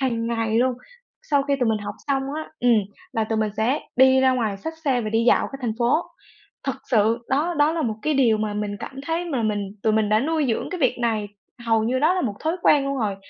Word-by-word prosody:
hằng 230 -4 -1
ngày 225 -1 0
luôn. 255 +1 +3 0.5
Sau 285 -2 +1
khi 280 0 0
tụi 240 - +2
mình 220 -1 +1
học 205 0 -6
xong 270 -1 +1
á, 315 0 -5
ừm, 240 -2 +4 0.3
là 225 -1 0
tụi 220 0 -2
mình 215 -1 0
sẽ 235 +6 +1 0.2
đi 260 0 +6
ra 260 0 +4
ngoài 220 -6 -1
xách 320 +11 -6
xe 260 -3 +2
và 215 - -3
đi 225 +1 +1
dạo - - +4
cả 275 - -6
thành 225 -3 0
phố. 240 +6 +3 0.7
Thật 270 - -1 0.2
sự 225 0 +3
đó 310 +6 +1
đó 295 +2 +4
là 330 -2 -1
một 220 -3 -1
cái 305 - +1
điều 235 -6 +3
mà 215 -1 -2
mình 205 -1 -3
cảm 270 - -7
thấy 330 +2 -1
mà 270 -9 -2
mình 210 -1 0 0.2
tụi 220 - +2
mình 215 -1 +2
đã 215 +1 +3
nuôi 310 0 0
dưỡng 225 - -1
cái 365 -3 -5
việc 255 -2 +2
này, 220 -3 0 0.4
hầu 225 -1 +2
như 255 +3 0
đó 315 +6 +3
là 370 - 0
một 210 -5 -2
thói 320 +3 -1
quen 285 -2 +4
luôn 275 0 -2
rồi. 205 -4 -1
240 Hz, 255 wpm, -23 LUFS, 220-275 Hz, 0.7 s, đi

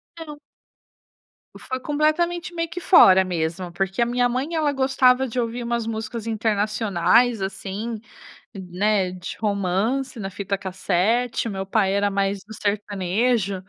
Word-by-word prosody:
Não. 300 -3 -9 1.2
E - - -11
foi 260 0 -5
completamente 335 +5 0
meio 335 -1 -2
que 360 - -6
fora 190 - +7
mesmo, 175 0 -3
porque 195 +5 -2
a - - +4
minha 245 +1 +1
mãe 265 +7 -2
ela 300 -2 +1
gostava 265 -1 +3
de 245 +2 -3
ouvir 235 +1 -2
umas 235 -1 -2
músicas 225 0 -5
internacionais, 215 0 +1
assim, 205 +3 -4 0.6
né, 190 +1 0
de 180 -1 -7
romance 210 +6 -1
na 195 -2 -5
fita 195 +1 -3
cassete, 200 +6 0
meu 195 -2 -4
pai 195 -1 +1
era 200 0 +1
mais 195 0 -1
do 220 +1 -11
sertanejo, 205 0 -1
215 Hz, 140 wpm, -23 LUFS, 195-250 Hz, 1.2 s, fora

